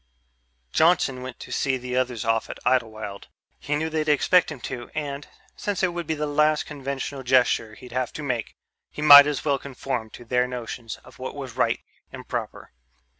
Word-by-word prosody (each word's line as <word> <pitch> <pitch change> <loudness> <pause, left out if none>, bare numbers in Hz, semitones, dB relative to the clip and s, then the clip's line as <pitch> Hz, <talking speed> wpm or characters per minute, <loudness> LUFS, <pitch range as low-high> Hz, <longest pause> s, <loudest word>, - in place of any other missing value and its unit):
Johnson 155 -6 +3
went 130 -1 -8
to - - -9
see 135 -1 0
the 125 0 -5
others 125 -3 -1
off 115 0 +1
at - - -6
Idlewild. 110 -5 -1 0.3
He 150 - -2
knew 155 +2 -1
they'd 155 -1 -1
expect 160 +4 +4
him 150 - -7
to 120 -1 -6
and, 145 -1 -4 0.3
since 205 -3 -3
it 185 - +4
would 170 -2 -4
be 160 - 0
the 150 0 -2
last 150 +1 +2
conventional 140 -1 -5
gesture 125 -4 +2
he'd 125 +1 -13
have 130 0 -1
to 155 - -6
make, 125 -5 -3 0.3
he 150 - -6
might 145 -1 +11
as 150 0 -2
well 140 -2 +2
conform 130 -4 -4
to 120 - -12
their 125 +1 +1
notions 120 -2 -6
of - - -17
what - - -5
was - - -7
right - - +1 0.3
and - - -10
proper. - - -5
135 Hz, 190 wpm, -25 LUFS, 125-150 Hz, 0.3 s, might